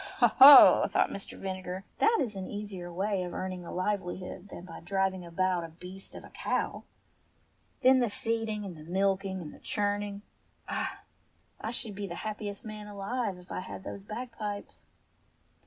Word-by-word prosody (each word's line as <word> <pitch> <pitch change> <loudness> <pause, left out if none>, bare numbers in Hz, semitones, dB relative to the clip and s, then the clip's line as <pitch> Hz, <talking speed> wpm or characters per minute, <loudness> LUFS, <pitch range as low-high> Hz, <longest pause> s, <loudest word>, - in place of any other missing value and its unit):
"Ho, - - +6
ho! 280 +2 +11
" - - -12
thought - - +2
Mr. 195 - -6
Vinegar. 185 -1 -5 0.2
"That 455 +1 +4
is 225 -6 -1
an 190 -1 -5
easier 200 -4 -6
way 195 +2 -1
of 180 -1 -5
earning 185 -1 -4
a - - -8
livelihood 185 0 -3
than 175 - -9
by 165 - -9
driving 190 0 -1
about 175 +1 0
a 165 - -6
beast 180 +4 -10
of - - -8
a - - -13
cow! - - -2 1.0
Then 260 +1 +7
the 240 -2 +2
feeding, 225 -1 -2
and 185 -3 -6
the 155 - -11
milking, 195 0 +1
and 150 - -9
the - - -14
churning! 205 -1 -2 0.4
Ah, - - -3 0.6
I 220 - -4
should 225 -2 -4
be 200 0 -5
the 170 - -6
happiest 210 -1 -4
man 215 -1 -7
alive 205 0 -3
if 180 +1 -14
I - - -2
had 185 +1 -7
those 195 - -7
bag 235 +4 -6
pipes 210 -2 -6
195 Hz, 180 wpm, -30 LUFS, 185-210 Hz, 1.0 s, ho